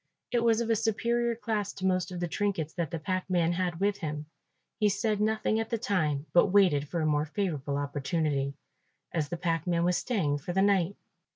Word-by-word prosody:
It 240 -1 +2
was 230 -1 +3
of 230 0 0
a - - +4
superior 235 +2 +1
class 215 -4 -2
to 190 - -5
most 185 -1 +1
of 180 - -5
the 175 - -1
trinkets 170 -4 -1
that 170 -4 -2
the 165 - -3
packman 180 -1 0
had 175 -1 -1
with 200 +1 +1
him. 150 -4 -4 0.5
He 210 -2 +4
said 210 +1 0
nothing 215 0 +1
at 225 - -2
the 230 - 0
time 160 - 0
but 175 - +6
waited 180 -7 +4
for 170 +2 -2
a - - +1
more 150 -1 +2
favourable 150 -7 -2
opportunity, 145 0 -1 0.6
as 155 -4 -1
the 175 - -3
packman 170 0 0
was 180 0 +2
staying 155 - 0
for 175 +5 -5
the 190 +1 +3
night. 200 -2 +2
180 Hz, 200 wpm, -29 LUFS, 155-205 Hz, 0.6 s, but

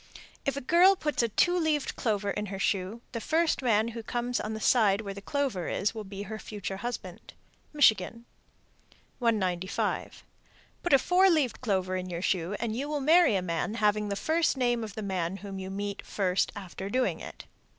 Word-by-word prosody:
If 275 - 0
a - - -3
girl 350 +8 +6
puts 300 -7 -1
a 235 - +1
two 350 - +3
leaved 315 -4 0
clover 205 -3 0
in 210 +1 -3
her 195 0 -5
shoe, 195 +4 -1
the 230 - -4
first 320 +2 +1
man 225 -3 +2
who 230 0 -6
comes 240 +2 -2
on 220 +1 -3
the - - -5
side 215 -3 +3
where 200 -2 -5
the 200 - -9
clover 255 - -2
is 200 - 0
will 220 -1 -5
be 200 0 -7
her 215 +1 -6
future 200 -3 -5
husband. 240 +4 -6 0.4
Michigan. 230 -5 +3 0.9
195. 190 -6 -1 0.6
Put 350 - 0
a - - +9
four 365 +7 +4
leaved 295 - +1
clover 190 -5 0
in 185 0 -4
your 175 0 -4
shoe, 185 +1 0
and 225 -1 -2
you 280 +4 -3
will 300 -1 -1
marry 315 - +5
a 185 - 0
man 170 +5 -2
having 210 -1 +1
the 200 - -1
first 315 +5 +1
name 240 -2 +1
of 210 -2 -7
the 220 - -4
man 190 -2 -2
whom 200 -1 -7
you 190 0 -6
meet 200 +1 -4
first 185 -2 0
after 195 -1 -7
doing 255 +4 0
it. - - -9
215 Hz, 195 wpm, -29 LUFS, 195-260 Hz, 0.9 s, a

